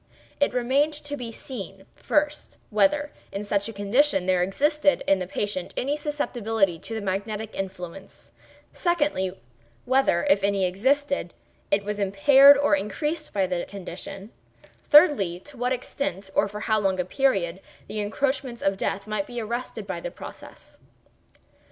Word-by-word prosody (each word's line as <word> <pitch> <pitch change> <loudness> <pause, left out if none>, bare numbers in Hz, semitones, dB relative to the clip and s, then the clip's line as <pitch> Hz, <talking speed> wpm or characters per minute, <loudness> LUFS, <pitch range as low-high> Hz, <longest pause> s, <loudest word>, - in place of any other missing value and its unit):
It 285 - +3
remained 270 +5 +2
to 290 -1 -4
be 245 -4 -6
seen, 195 -5 -8
first, 300 0 -1
whether, 290 +6 +2 0.2
in 200 - -4
such 205 +1 -1
condition, 205 +1 +2
there 185 -1 +2
existed 290 - +2
in 195 -1 +3
the 180 - -4
patient 195 -1 -3
any 280 +3 0
susceptibility 225 - -1
to 225 - -6
the 220 - -3
magnetic 205 +3 -3
influence; 190 0 -7 0.4
secondly, 295 - 0 0.5
whether, 260 -9 +3
if 200 - +3
any 200 -1 +2
existed, 265 +3 0 0.3
it 200 0 +2
was 210 0 -3
impaired 270 +9 +7
or 290 +1 +3
increased 300 +6 -3
by 195 -2 +1
the 180 -1 -2
condition; 195 +2 -8 0.5
thirdly, 285 - +5
to 290 +5 -12
what 250 +1 -1
extent, 225 -6 -3
or 205 - +3
for 210 +1 -7
how 220 -1 +1
long 190 -2 0
a 180 - 0
period, 190 -7 0 0.3
the 215 - -4
encroachments 260 +3 -2
of 195 0 +1
Death 195 0 -2
might 215 -2 -2
be 240 -1 -5
arrested 235 +3 -4
by - - -4
the - - -5
process. - - -12
215 Hz, 150 wpm, -25 LUFS, 195-280 Hz, 0.5 s, impaired